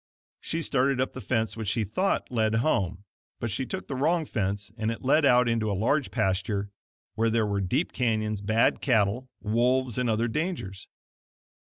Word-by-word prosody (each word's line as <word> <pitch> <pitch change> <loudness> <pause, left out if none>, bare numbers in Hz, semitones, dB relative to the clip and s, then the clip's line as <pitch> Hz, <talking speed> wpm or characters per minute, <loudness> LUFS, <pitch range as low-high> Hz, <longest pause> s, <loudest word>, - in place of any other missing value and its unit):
She 165 0 -3
started 135 -2 +1
up 130 - 0
the 130 - -7
fence 110 -5 -1
which 110 -2 -5
she 110 +3 +1
thought 155 - -1
led 110 -2 +1
home, 100 - 0 0.4
but 115 - -3
she 130 +6 -2
took 190 - -5
the - - -4
wrong 160 +5 +1
fence 100 -4 -2
and 110 -1 -1
it 115 - -4
led 150 +3 +4
out 125 -2 +5
into 115 -2 +1
a 100 - -1
large 135 +7 +1
pasture 100 -1 -1 0.4
where 115 +1 +1
there 110 -1 +2
were 100 -1 -1
deep 130 - 0
canyons, 110 -4 0
bad 110 +3 +2
cattle, 120 0 +1
wolves, 125 +3 +1
and 125 -2 +1
other 115 +1 +1
dangers. 150 - -3
115 Hz, 180 wpm, -27 LUFS, 105-130 Hz, 0.4 s, out